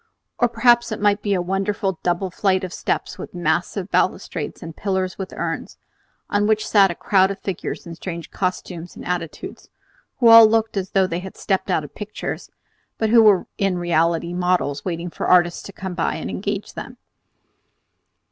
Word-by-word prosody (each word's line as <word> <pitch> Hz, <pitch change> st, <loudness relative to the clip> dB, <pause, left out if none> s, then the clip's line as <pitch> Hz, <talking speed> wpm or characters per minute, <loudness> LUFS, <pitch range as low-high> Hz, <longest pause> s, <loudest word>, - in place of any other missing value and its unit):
Or 240 Hz, -, +3 dB
perhaps 240 Hz, +1 st, +3 dB
it 215 Hz, -, -3 dB
might 205 Hz, 0 st, +2 dB
be 200 Hz, -1 st, 0 dB
a 180 Hz, -, 0 dB
wonderful 195 Hz, 0 st, -1 dB
double 180 Hz, +1 st, -1 dB
flight 190 Hz, 0 st, +1 dB
of 180 Hz, -2 st, -5 dB
steps -, -, -3 dB
with -, -, -8 dB
massive 175 Hz, +3 st, -1 dB
balustrades -, -, -1 dB
and 165 Hz, -1 st, -8 dB
pillars 190 Hz, -2 st, -2 dB
with 190 Hz, -, -5 dB
urns, -, -, -4 dB, 0.5 s
on 205 Hz, 0 st, +1 dB
which 215 Hz, 0 st, +1 dB
sat 200 Hz, -2 st, +5 dB
a 175 Hz, -, -4 dB
crowd 190 Hz, +1 st, +3 dB
of 195 Hz, -, -4 dB
figures 190 Hz, -4 st, -5 dB
in 170 Hz, -, -7 dB
strange 170 Hz, 0 st, -7 dB
costumes 180 Hz, -2 st, -4 dB
and -, -, -10 dB
attitudes, 170 Hz, -3 st, -5 dB, 0.5 s
who 240 Hz, -, +4 dB
all 230 Hz, -1 st, +10 dB
looked 225 Hz, 0 st, +1 dB
as 190 Hz, -1 st, -2 dB
though 195 Hz, -1 st, +3 dB
they 170 Hz, -1 st, -3 dB
had 190 Hz, +1 st, -9 dB
stepped 190 Hz, -1 st, -1 dB
out 170 Hz, -4 st, +1 dB
of 145 Hz, -, -11 dB
pictures, 210 Hz, 0 st, -6 dB, 0.5 s
but 220 Hz, -1 st, 0 dB
who 230 Hz, -1 st, +7 dB
were 210 Hz, -4 st, +5 dB
in 195 Hz, -2 st, +1 dB
reality 170 Hz, 0 st, +1 dB
models 180 Hz, -5 st, 0 dB
waiting 170 Hz, -1 st, -4 dB
for -, -, -4 dB
artists 175 Hz, -1 st, +4 dB
to -, -, -9 dB
come 190 Hz, -1 st, -6 dB
by 170 Hz, -, -1 dB
and -, -, -5 dB
engage 205 Hz, +1 st, -4 dB
them. -, -, -8 dB
190 Hz, 185 wpm, -22 LUFS, 175-205 Hz, 0.5 s, all